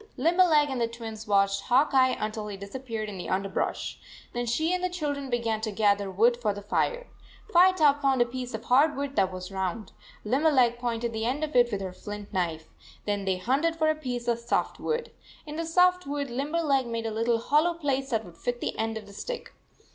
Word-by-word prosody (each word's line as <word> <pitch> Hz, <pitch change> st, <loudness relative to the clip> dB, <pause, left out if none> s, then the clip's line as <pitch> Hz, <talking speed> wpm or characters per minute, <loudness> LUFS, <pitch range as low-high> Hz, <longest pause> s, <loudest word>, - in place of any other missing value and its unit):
Limberleg 330 Hz, -4 st, +4 dB
and 255 Hz, -2 st, -2 dB
the 230 Hz, -, +2 dB
Twins 225 Hz, -2 st, -8 dB
watched 200 Hz, -1 st, +3 dB
Hawk 265 Hz, +5 st, +3 dB
Eye 260 Hz, -1 st, +4 dB
until 215 Hz, 0 st, -3 dB
he 205 Hz, -2 st, -6 dB
disappeared 220 Hz, +2 st, -5 dB
in 200 Hz, -3 st, -7 dB
the -, -, -5 dB
underbrush. 195 Hz, 0 st, -2 dB, 0.3 s
Then 240 Hz, 0 st, -2 dB
she 315 Hz, +9 st, +1 dB
and 365 Hz, 0 st, -1 dB
the 365 Hz, -, +1 dB
children 290 Hz, -6 st, -3 dB
began 230 Hz, -3 st, -1 dB
to 220 Hz, -1 st, -2 dB
gather 205 Hz, -1 st, +2 dB
wood 230 Hz, +6 st, +3 dB
for 215 Hz, -4 st, -1 dB
the 205 Hz, -, -8 dB
fire. -, -, 0 dB, 0.5 s
Firetop 340 Hz, -5 st, +5 dB
found 270 Hz, -2 st, +2 dB
a 240 Hz, -, +5 dB
piece 250 Hz, -1 st, -5 dB
of 220 Hz, -, -7 dB
hard 285 Hz, +5 st, +4 dB
wood 280 Hz, 0 st, -4 dB
that 190 Hz, -, +2 dB
was 185 Hz, +1 st, -7 dB
round. 190 Hz, +2 st, -3 dB, 0.3 s
Limberleg 255 Hz, -1 st, +3 dB
pointed 235 Hz, -1 st, -2 dB
the 220 Hz, 0 st, -2 dB
end 270 Hz, +6 st, -1 dB
of 305 Hz, 0 st, -3 dB
it 240 Hz, -1 st, +5 dB
with 200 Hz, -2 st, -2 dB
her 190 Hz, -1 st, -5 dB
flint 205 Hz, +1 st, -8 dB
knife. 165 Hz, -4 st, -1 dB, 0.4 s
Then 205 Hz, -1 st, -1 dB
they 190 Hz, -1 st, +1 dB
hunted 275 Hz, -, +1 dB
for 315 Hz, -1 st, +2 dB
a -, -, -2 dB
piece 250 Hz, -5 st, -4 dB
of 235 Hz, -1 st, +1 dB
soft 235 Hz, +1 st, -1 dB
wood. 465 Hz, +1 st, -2 dB, 0.3 s
In 300 Hz, 0 st, -7 dB
the 330 Hz, +1 st, -2 dB
soft 360 Hz, 0 st, +3 dB
wood 285 Hz, -2 st, -3 dB
Limberleg 280 Hz, 0 st, 0 dB
made 230 Hz, -1 st, -3 dB
a 225 Hz, -, -2 dB
little 230 Hz, +2 st, +1 dB
hollow 300 Hz, +8 st, +2 dB
place 275 Hz, -4 st, -1 dB
that 225 Hz, -3 st, -1 dB
would 170 Hz, -1 st, -14 dB
fit 245 Hz, 0 st, -2 dB
the -, -, -3 dB
end 225 Hz, 0 st, -1 dB
of 215 Hz, -, -8 dB
the 200 Hz, -, -13 dB
stick. -, -, -6 dB
240 Hz, 215 wpm, -27 LUFS, 215-290 Hz, 0.5 s, Firetop